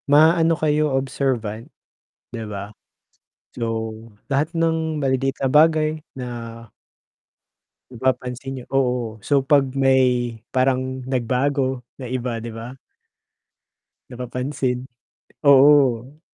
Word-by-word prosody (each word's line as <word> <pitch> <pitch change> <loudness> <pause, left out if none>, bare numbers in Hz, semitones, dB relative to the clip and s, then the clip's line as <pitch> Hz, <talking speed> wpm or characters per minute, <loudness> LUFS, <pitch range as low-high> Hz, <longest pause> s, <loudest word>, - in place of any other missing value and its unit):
Maano 160 +2 +5
kayo, 150 -1 +1
observant 125 -5 -2 0.7
di 115 - -4
ba? 100 +1 -7 0.8
So, 115 -1 -2 0.4
lahat 145 +4 0
ng 160 -2 0
maliliit 135 0 0
na 135 - +2
bagay 155 +1 +4 0.2
na 125 -2 -6 1.6
mapapansin 130 +1 -2
niyo. 125 -2 -8
Oo, 125 -4 0
so 140 +5 +1
'pag 140 -1 +4
may 125 -3 +2 0.2
parang 130 0 0
nagbago 130 +1 0 0.2
na 130 - -6
iba, 125 -2 -3
di 115 - -7
ba? 115 +2 -7 1.4
Napapansin, 125 +1 -3 0.6
oo. 140 -2 +5
130 Hz, 95 wpm, -22 LUFS, 125-145 Hz, 1.6 s, Maano